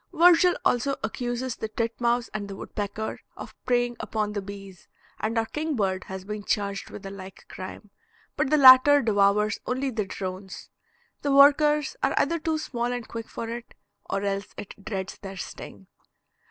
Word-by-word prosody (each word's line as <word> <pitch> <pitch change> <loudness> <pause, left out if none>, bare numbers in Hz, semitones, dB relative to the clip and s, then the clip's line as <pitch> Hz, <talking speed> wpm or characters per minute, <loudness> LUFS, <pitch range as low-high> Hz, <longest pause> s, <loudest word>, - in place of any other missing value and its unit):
Virgil 350 +1 +5
also 270 +3 +2
accuses 245 +2 -3
the 220 - -3
titmouse 235 +2 -1
and 210 -2 -4
the 195 - -7
woodpecker 205 +2 -5 0.2
of - - -9
preying 245 -1 +1
upon 210 -1 -2
the 205 - -2
bees, 195 -1 -10 0.3
and 225 +2 -2
our 225 - +2
kingbird 220 -11 -2
has 190 0 -7
been 210 0 -5
charged 200 -1 -2
with 205 - -9
the 195 - -7
like 190 -1 -11
crime, 190 +2 -9 0.4
but - - 0
the 305 - +4
latter 275 +1 +8
devours 210 -1 +2
only 260 +2 -1
the 220 -4 -2
drones. 190 0 -7 0.5
The 285 - 0
workers 295 +1 +5
are - - +1
either 335 0 +2
too 315 0 -1
small 245 -5 -3
and 245 -2 -4
quick 230 -1 -6
for 230 - -5
it, 235 +1 -7 0.3
or 195 - -1
else 200 0 -3
it 200 0 -9
dreads 195 -3 -5
their 195 -1 -8
sting. 100 - -9
220 Hz, 165 wpm, -26 LUFS, 200-260 Hz, 0.5 s, latter